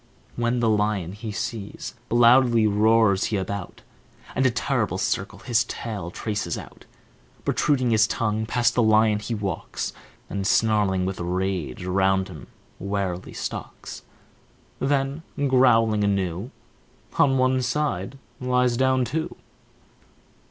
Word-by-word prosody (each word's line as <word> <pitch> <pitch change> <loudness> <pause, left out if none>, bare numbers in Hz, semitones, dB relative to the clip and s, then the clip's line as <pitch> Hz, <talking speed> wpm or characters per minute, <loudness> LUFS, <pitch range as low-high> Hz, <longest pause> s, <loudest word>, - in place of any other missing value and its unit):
When 120 +1 0
the 115 - +2
lion 105 -5 +1
he 105 +2 -6
sees, 105 0 -5 0.2
loudly 120 -1 +5
roars 105 -1 +3
he 105 - -1
about, 95 0 -5 0.5
And 130 0 +2
a - - +4
terrible 120 -6 -1
circle 100 +1 -2
his 115 +2 +1
tail 105 -7 -5
traces 100 -4 -3
out. - - -11 0.6
Protruding 130 -5 +1
his 110 -1 +4
tongue, 110 -1 -1
past 120 +1 +2
the 125 - +2
lion 110 -1 +4
he 110 +2 -4
walks, 100 -5 -4 0.3
And, 100 -1 -3
snarling 100 -4 +2
with 95 0 -3
rage, 90 -4 -2
round 95 +1 +1
him 75 -9 -10 0.3
warily 100 -2 -3
stalks - - -6 0.8
Then, 135 +2 0 0.3
growling 115 -5 +4
anew, 100 +1 -1 0.7
On 135 -2 +4
one 130 0 +2
side 135 -5 -2 0.2
lies 125 -1 +1
down 130 0 +2
too. 155 +7 -3
110 Hz, 125 wpm, -24 LUFS, 95-125 Hz, 0.8 s, loudly